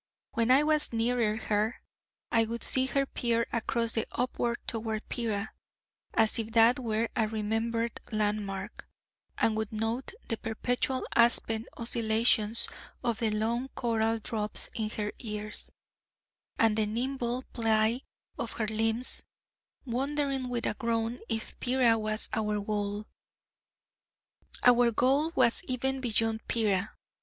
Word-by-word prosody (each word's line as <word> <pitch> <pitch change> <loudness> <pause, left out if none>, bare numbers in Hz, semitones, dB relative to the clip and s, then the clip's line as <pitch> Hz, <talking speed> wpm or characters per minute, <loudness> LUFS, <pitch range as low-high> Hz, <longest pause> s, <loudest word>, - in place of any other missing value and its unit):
When 230 +1 0
I 265 +3 +6
was 305 0 +3
nearer 230 -2 +1
her, 215 +1 0 0.5
I 230 -1 +4
would 235 +1 -5
see 260 0 +2
her 275 +1 +1
peer 235 -3 0
across 230 0 0
and 225 - 0
upward 240 -1 -1
toward 220 -1 -3
Pera, 220 -3 -2 0.6
as 220 +1 +4
if 225 0 -4
that 230 +3 +6
were 225 -2 -1
a 220 -2 +2
remembered 225 +2 -1
land 210 -1 +1
mark, 195 +2 -7 0.5
and 220 - +2
would 220 -1 -2
note 225 - -2
the 225 - -1
perpetual 245 +3 -1
aspen 230 -1 +3
oscillations 225 -1 +1 0.4
of 235 -2 0
the 225 - +1
long 225 +4 -1
coral 225 -2 +1
drops 215 -1 +1
in 220 -1 -2
her 210 -1 -3
ears, 210 -2 -5 0.9
and 225 -2 +4
the 215 -1 +2
nimble 245 +2 -2
ply 225 +1 +2 0.4
of - - -3
her 220 - -1
limbs, 225 +3 +2 0.6
wondering 270 +1 -1
with 240 -1 -2
a - - +1
groan 230 +2 -1
if 225 -1 -4
Pera 250 -2 +3
was 215 0 -1
our 210 -1 0
goal. 205 0 -2 1.6
Our 245 -1 +6
goal 265 +7 +2
was 235 -3 +5
even 265 +1 -1
beyond 225 -2 0
Pera. 210 -3 +1
225 Hz, 130 wpm, -30 LUFS, 220-240 Hz, 1.6 s, I